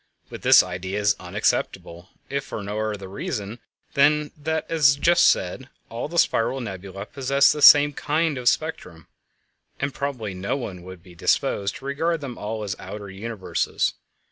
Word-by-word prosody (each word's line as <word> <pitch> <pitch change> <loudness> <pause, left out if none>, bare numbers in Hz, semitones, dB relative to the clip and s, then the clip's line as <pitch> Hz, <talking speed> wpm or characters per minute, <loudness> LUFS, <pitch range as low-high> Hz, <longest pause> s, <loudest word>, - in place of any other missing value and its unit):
But - - -8
this - - +7
idea 95 +2 -4
is 100 -1 +2
unacceptable 85 +2 -2 0.2
if 140 0 -3
for 105 - -6
no 105 +2 -4
other 100 -2 -7
reason 100 +3 -5 0.3
than 150 +1 +3
that, 160 +1 -2
as 150 -4 +4
just 170 +4 +4
said, 125 +9 0 0.2
all 115 +4 -4
the 170 +3 -6
spiral 130 -3 +2
nebulæ 100 -2 -7
possess 140 +1 +3
the 150 - -3
same 145 0 +8
kind 155 0 -1
of 120 -1 +4
spectrum, 120 - -4 0.7
and 140 0 -2
probably 125 -8 -4
no 95 +7 -2
one 95 -9 -6
would 90 -1 -11
be 90 - -15
disposed 100 +3 0
to 135 - -11
regard 165 +4 -1
them 135 -4 -7
all 110 0 -5
as 100 -2 -3
outer 105 -2 -8
universes. 100 0 -2
115 Hz, 165 wpm, -23 LUFS, 100-140 Hz, 0.7 s, same